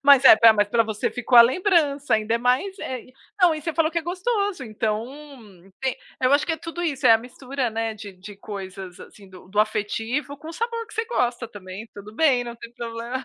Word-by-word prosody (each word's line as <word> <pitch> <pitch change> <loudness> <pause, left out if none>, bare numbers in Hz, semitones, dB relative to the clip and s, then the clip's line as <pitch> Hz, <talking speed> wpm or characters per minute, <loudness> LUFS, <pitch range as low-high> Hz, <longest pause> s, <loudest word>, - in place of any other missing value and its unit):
Mas 280 -1 +6
é, - - +11
espera, 225 +1 +7
mas 205 -1 +1
pra 230 +1 +3
você 215 -1 -2
ficou 245 0 +3
a - - +12
lembrança, 290 - +2
ainda 220 +1 0
é - - +1
mais, 255 - 0
é 260 -7 -5
e 255 - -20 0.3
não, 350 -3 +5
e 310 - -6
você 330 - -3
falou 325 -1 +2
que 335 - 0
é - - -6
gostoso, 380 - -2
então 215 0 -2 0.8
tem 265 -1 -1 0.3
eu 255 +2 +3
acho 285 - +3
que 330 - 0
é 320 - -2
tudo 335 +1 -6
isso, 280 -5 0
é 230 - +8
a 225 - +5
mistura, 255 +1 -4
né, 225 0 -3
de 205 -2 -10
de 195 +2 -12
coisas, 190 -3 -8
assim, 200 -2 -14
do 185 -1 -15
do 205 +2 -5
afetivo 225 +7 -2
com 315 +3 -11
o - - -6
sabor 460 +4 -3
que - - -14
você 450 - -1
gosta 245 - -1
também, 200 +1 -10
tudo 210 +1 -11
bem, 255 -4 +3
não 235 0 -8
tem 235 0 -11
problema 235 +2 -5
245 Hz, 235 wpm, -23 LUFS, 215-310 Hz, 0.8 s, a